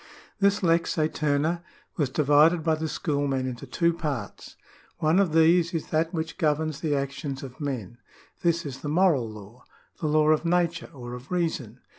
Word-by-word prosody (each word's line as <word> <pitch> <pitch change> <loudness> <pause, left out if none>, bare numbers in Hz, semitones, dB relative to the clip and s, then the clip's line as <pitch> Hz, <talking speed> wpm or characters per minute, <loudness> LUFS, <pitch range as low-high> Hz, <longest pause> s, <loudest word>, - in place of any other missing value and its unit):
^ - - -21 0.4
This 200 0 +2
lex 170 -1 +2
aeterna 155 +1 0 0.3
was 145 -6 0
divided 150 +4 +4
by 160 - +2
the 160 0 -2
schoolmen 140 -5 -1
into 130 +1 -6
two 170 +6 +1
parts. 145 - -5 0.4
One 160 +4 +3
of 195 -5 +2
these 165 +2 +4
is 160 - -3
that 160 +1 +1
which 160 -1 -4
governs 155 -1 0
the 150 -3 0
actions 140 0 -4
of 135 +3 -10
men: 120 -5 -4 0.4
this 170 -1 +1
is 135 -2 -6
the 145 - -4
moral 155 -8 +3
law, 110 +3 -12 0.4
the 155 - -1
law 155 0 +3
of 155 0 +3
nature, 170 0 0
or 120 -5 -8
of 125 +3 -9
reason. 160 - -2
155 Hz, 175 wpm, -26 LUFS, 135-165 Hz, 0.4 s, divided